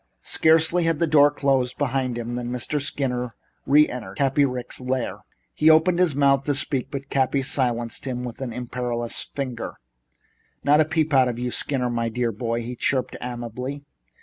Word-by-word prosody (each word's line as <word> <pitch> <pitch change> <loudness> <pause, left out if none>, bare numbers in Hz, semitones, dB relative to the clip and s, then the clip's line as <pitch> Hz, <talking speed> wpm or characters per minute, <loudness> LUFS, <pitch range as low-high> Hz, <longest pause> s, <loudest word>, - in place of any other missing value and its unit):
Scarcely 160 +2 +4
had 165 -2 +2
the 170 - +2
door 145 -2 +6
closed 135 -3 0
behind 130 -3 -1
him 120 0 -4
than 120 0 -3
Mr. 125 +4 -2
Skinner 125 -4 -2 0.3
re 150 +2 +6
entered 105 -6 -7
Cappy 140 +1 +2
Ricks' 125 -1 -4
lair. 125 -1 -2 0.3
He 155 - +4
opened 165 +3 +5
his 175 -6 +2
mouth 140 -1 +3
to 145 - +1
speak, 135 -2 -1
but 140 -1 -7
Cappy 135 0 +1
silenced 120 -3 -2
him 125 -2 -3
with 125 +1 -7
an 130 -3 -3
imperious 120 -1 -3
finger. 130 -4 -5 0.9
"Not 150 +2 +5
a - - +3
peep 160 -1 0
out 130 -2 +5
of 120 -2 -3
you, 125 0 -3
Skinner, 125 -2 0
my 115 -1 -1
dear 120 0 -1
boy," 115 +2 -3
he 125 +2 -6
chirped 130 +1 -1
amiably. 125 +3 -5
130 Hz, 175 wpm, -24 LUFS, 120-145 Hz, 0.9 s, door